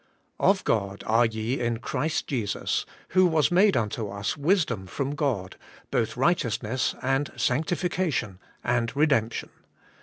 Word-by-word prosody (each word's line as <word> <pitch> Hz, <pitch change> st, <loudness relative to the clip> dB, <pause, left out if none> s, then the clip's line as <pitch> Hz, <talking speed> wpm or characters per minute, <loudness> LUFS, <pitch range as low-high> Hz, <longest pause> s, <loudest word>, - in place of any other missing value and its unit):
*0f 195 Hz, -1 st, +3 dB
God 100 Hz, -2 st, -1 dB
are 115 Hz, +2 st, +4 dB
ye 115 Hz, +4 st, -2 dB
in 120 Hz, -1 st, 0 dB
Christ 155 Hz, +6 st, -2 dB
Jesus, 115 Hz, -8 st, -1 dB, 0.2 s
who 185 Hz, +1 st, +5 dB
was 160 Hz, -2 st, +2 dB
made 190 Hz, +1 st, +5 dB
unto 110 Hz, -1 st, -2 dB
us 100 Hz, 0 st, -2 dB
wisdom 145 Hz, -, +1 dB
from 140 Hz, +7 st, -3 dB
God, 125 Hz, -, -2 dB, 0.3 s
both 115 Hz, 0 st, 0 dB
righteousness 125 Hz, -5 st, +1 dB
and 135 Hz, +2 st, 0 dB
sanctification, 155 Hz, -, -1 dB, 0.2 s
and 120 Hz, +1 st, 0 dB
redemption.' 140 Hz, -7 st, +1 dB
125 Hz, 125 wpm, -26 LUFS, 110-155 Hz, 0.3 s, who